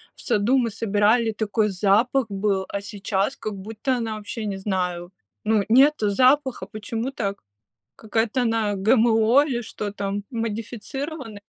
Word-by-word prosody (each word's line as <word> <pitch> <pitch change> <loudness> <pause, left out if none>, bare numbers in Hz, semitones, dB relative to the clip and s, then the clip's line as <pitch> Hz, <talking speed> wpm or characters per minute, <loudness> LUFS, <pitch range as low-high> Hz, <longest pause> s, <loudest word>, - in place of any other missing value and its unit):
в - - -14
саду 220 +6 +2
мы 235 - 0
собирали, 220 +2 +2
такой 215 0 0
запах 215 +7 +2
был, 195 -1 0
а 200 - -3
сейчас 200 -1 -2
как 215 -1 -5
будто 220 +6 -3
она 225 -2 -3
вообще, 215 +1 -6
не 200 -2 -3
знаю. 180 -3 -2 0.3
Ну, 215 -1 +2
нету 260 -2 +5
запаха. 260 +4 +2
Почему 225 +3 -4
так? 200 -6 -3 0.5
Какая-то 225 +2 -1
она 225 -3 +1
ГМО 225 +5 +4
или 245 -5 -2
что 210 -3 -6
там, 200 0 -3
модифицирована? 230 +3 -5
220 Hz, 140 wpm, -23 LUFS, 205-235 Hz, 0.5 s, нету